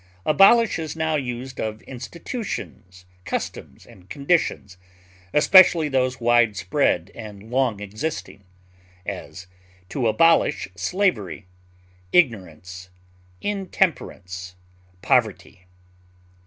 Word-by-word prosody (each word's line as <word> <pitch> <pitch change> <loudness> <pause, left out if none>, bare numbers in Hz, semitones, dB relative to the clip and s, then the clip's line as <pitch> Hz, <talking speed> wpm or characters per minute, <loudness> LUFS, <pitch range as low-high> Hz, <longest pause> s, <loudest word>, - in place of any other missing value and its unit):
Abolish 195 +7 +5
is 160 -2 -5
now 160 -1 -1
used 130 -2 -5
of 110 0 -4
institutions, 125 - -7 0.2
customs, - - -6
and 90 0 -18
conditions, 140 - -1 0.5
especially 165 0 +6
those 130 -1 0
wide 120 -2 +3
spread 95 -1 0
and 105 0 -10
long 125 -5 +1
existing; 105 +1 -6 0.6
as, 90 - -7 0.4
to 125 +1 -1
abolish 165 +6 +3
slavery, 105 - -1 0.7
ignorance, 95 - 0 0.5
intemperance, 130 - -2 0.5
poverty. 95 0 0
120 Hz, 85 wpm, -23 LUFS, 100-160 Hz, 0.7 s, especially